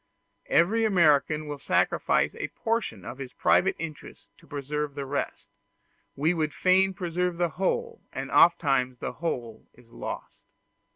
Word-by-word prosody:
Every 215 +7 +3
American 155 -6 +3
will 145 -1 -6
sacrifice - - +1
a - - -4
portion 225 - -3
of 130 - -7
his 130 -2 -7
private 190 - +3
interests 155 -2 -8
to - - -20
preserve 145 0 -4
the 140 - -4
rest; 140 +1 -4 0.7
we 155 +5 +2
would 155 -3 -2
fain 190 +1 +3
preserve 175 0 -2
the 175 -1 +1
whole, 465 - -2
and - - -5
oftentimes 135 -7 +4
the - - -4
whole 120 -9 -5
is 120 -2 -21
lost. - - -7
155 Hz, 140 wpm, -27 LUFS, 140-180 Hz, 0.7 s, oftentimes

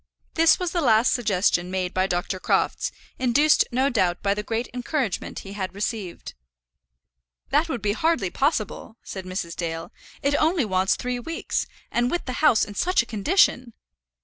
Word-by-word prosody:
This 325 0 +5
was 360 -2 -2
the 345 - 0
last 225 -3 +4
suggestion 195 -6 +1
made 185 -1 -2
by 185 0 +1
Dr. 180 +1 -2
Crofts, - - 0 0.3
induced 270 +5 +4
no 260 +3 +2
doubt 185 -9 0
by 200 -1 +2
the 210 - -3
great 225 +3 -3
encouragement 250 - -2
he 195 - -8
had 190 -2 -4
received. 205 -3 -4 1.2
"That 305 +4 +2
would 240 -8 -3
be 205 -1 +1
hardly 260 - 0
possible," 230 - -1
said 190 -1 -7
Mrs. 185 -2 -4
Dale. 165 -1 -4 0.3
"It 280 +1 +2
only 320 -3 +2
wants 190 -1 +2
three 250 0 -3
weeks; 330 +7 -3 0.2
and 240 +1 +1
with 350 - -2
the 255 - -4
house 295 -8 +5
in 205 - -9
such 360 - +2
a - - -12
condition!" 240 - +2
225 Hz, 170 wpm, -24 LUFS, 190-280 Hz, 1.2 s, This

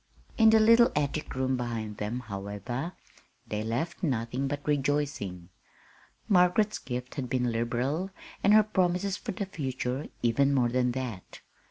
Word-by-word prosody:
In 220 -1 +6
the 220 0 +6
little 230 +2 +6
attic 150 0 -1
room 130 0 0
behind 115 -4 -4
them, 110 +4 -3
however, 105 - -5 0.5
they 105 0 -3
left 125 +12 -2
nothing 130 - -1
but 145 +1 -4
rejoicing. 140 -11 -1 0.8
Margaret's 195 +3 +3
gifts 125 +1 -6
had 130 -3 -3
been 125 -1 +1
liberal, 125 +10 -1 0.3
and 200 - +5
her 215 - +7
promises 185 -1 0
for - - -5
the 200 +2 -3
future 135 -6 -3 0.2
even 140 +4 +3
more 125 -3 +3
than 125 0 +1
that. 120 -8 -6
130 Hz, 145 wpm, -29 LUFS, 120-170 Hz, 0.8 s, her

